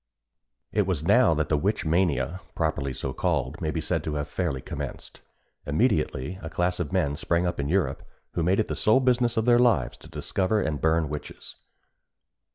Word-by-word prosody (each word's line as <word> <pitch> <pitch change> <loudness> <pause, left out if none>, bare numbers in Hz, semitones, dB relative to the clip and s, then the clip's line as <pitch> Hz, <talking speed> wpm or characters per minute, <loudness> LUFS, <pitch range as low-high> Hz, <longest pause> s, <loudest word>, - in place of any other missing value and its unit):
It 105 -3 +1
was 85 -6 -1
now 120 -1 +5
that 75 0 0
the 75 - +3
Witch 100 +7 0
Mania, 80 -1 +1
properly 75 -4 -1
so 65 +1 -4
called, - - -1
may - - -1
be - - -2
said - - -1
to 75 - -2
have 75 0 -2
fairly 75 -3 -2
commenced. - - -7 0.5
Immediately 80 - 0
a 80 - -6
class 90 +2 0
of 90 -2 -3
men 80 -7 +1
sprang 85 +2 0
up 85 - -2
in 70 0 -1
Europe, 95 +1 0 0.3
who - - -2
made 90 +5 +2
it 110 - +2
the - - -4
sole 110 +4 +4
business 125 -2 +2
of 110 - +2
their 120 -1 +5
lives 115 - +2
to - - -15
discover 100 +3 0
and 80 -7 -2
burn 80 +1 +3
the 75 - -4
witches. 75 0 -7
85 Hz, 195 wpm, -26 LUFS, 75-100 Hz, 0.5 s, now